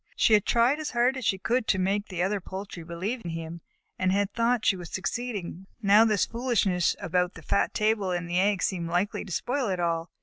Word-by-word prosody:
She 225 - +3
had 210 -1 +4
tried 240 +5 +3
as 310 - -3
hard 245 +2 +2
as 260 -3 -5
she 195 - +2
could 230 +4 0
to - - +2
make 195 +3 0
the 180 -2 -2
other 200 +1 -1
poultry 190 -1 -7
believe 185 +9 -4
in 170 - -5
him, 165 0 -6 0.4
and 185 0 +2
had 200 +1 0
thought 235 0 +1
she 195 - +4
was 175 -3 -8
succeeding, 195 -3 -4
but 220 - -9
now 210 +3 +7
this 215 -4 +2
foolishness 230 -7 +1
about 180 +1 0
the 165 - -11
fat 100 -5 0
table 215 -2 +1
and 175 -1 -2
the 175 +1 0
eggs 200 0 +2
seemed 170 -3 -2
likely 180 +4 -1
to 195 - -10
spoil 250 - -1
it 185 -2 -1
all. 170 -1 -1
195 Hz, 230 wpm, -27 LUFS, 175-225 Hz, 0.4 s, now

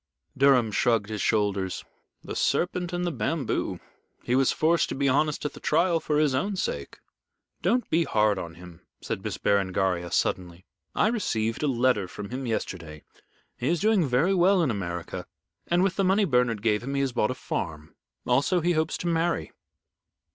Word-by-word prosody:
Durham 130 -5 +4
shrugged 110 -1 +1
his 105 -2 -3
shoulders. 100 -3 0 0.4
"The - - -6
serpent 180 0 0
in 175 0 -2
the 175 - 0
bamboo. 145 -1 -2 0.4
He 120 - -1
was 135 0 +3
forced 165 +1 +2
to - - -3
be 140 +1 +1
honest 150 +3 +1
at 150 - -2
the - - -11
trial 170 +2 +2
for 150 -2 -1
his 150 -3 +3
own 195 +10 -1
sake." 185 - -4 0.6
"Don't 245 0 +1
be 165 +1 +3
hard 105 -2 +2
on 85 -2 -7
him," 90 0 -13 0.2
said - - -5
Miss - - -3
Berengaria, 95 -3 0
suddenly. 90 +1 -1 0.3
"I - - +3
received 115 - -1
a 150 - +1
letter 125 -6 +2
from 100 +4 -8
him 130 0 -4
yesterday. 85 -8 -4 0.6
He 125 - -2
is 170 +2 +1
doing 210 -4 +3
very 135 +10 +2
well 185 0 +4
in 140 - +1
America, 85 -4 -5 0.4
and 175 +1 +2
with 195 -1 0
the 195 - +2
money 195 +2 +3
Bernard 125 - +1
gave 105 -2 +2
him 135 +3 -4
he 140 - +1
has 135 -1 0
bought 105 - +1
a 130 - -2
farm. 75 -8 -5 0.3
Also, 140 +9 +2
he 175 +1 +1
hopes 160 -1 0
to 175 - -4
marry." 165 - 0
130 Hz, 185 wpm, -26 LUFS, 100-170 Hz, 0.6 s, Durham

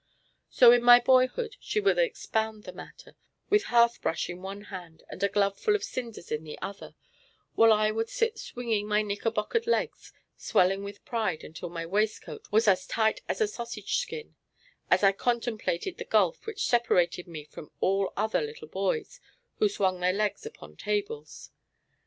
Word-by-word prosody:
So 245 -2 +7
in 245 0 +5
my 245 0 +9
boyhood 260 - +2
she 430 - -2
would 410 +3 +2
expound 220 - -1
the 180 - -9
matter, - - -13 0.4
with 415 -1 +4
hearthbrush 235 - +2
in 175 +1 -9
one 195 +2 -7
hand 170 -4 -9
and - - -9
a 200 - +2
glove 200 0 +1
full 425 - +2
of 410 - -2
cinders 235 - -6
in 150 +1 -2
the 155 - -8
other, 200 0 -8 0.6
while 225 0 +6
I 215 0 +3
would 225 +1 -2
sit 460 -2 -1
swinging 225 -4 -3
my 210 0 +2
knickerbockered 215 - -1
legs, 470 - -1 0.2
swelling 195 +2 +1
with 200 0 -9
pride 220 -9 -2
until 165 +2 -8
my 165 -1 -5
waistcoat 210 +5 -2
was 220 +2 +3
as 190 -2 +3
tight 220 -1 +1
as - - -2
a 435 - +4
sausage 235 - -4
skin, 455 - -5 0.5
as - - +3
I 195 - +7
contemplated 235 - -2
the - - -3
gulf - - +1
which 435 -2 -2
separated 180 -7 +2
me 160 -3 -8
from 150 - -11
all 195 0 +1
other 220 +2 +1
little 450 +1 -7
boys 465 -3 -2 0.4
who 425 - +4
swang 190 - 0
their 180 +1 +2
legs 210 - -1
upon 450 - -13
tables. 420 +2 -4
220 Hz, 170 wpm, -28 LUFS, 195-265 Hz, 0.6 s, my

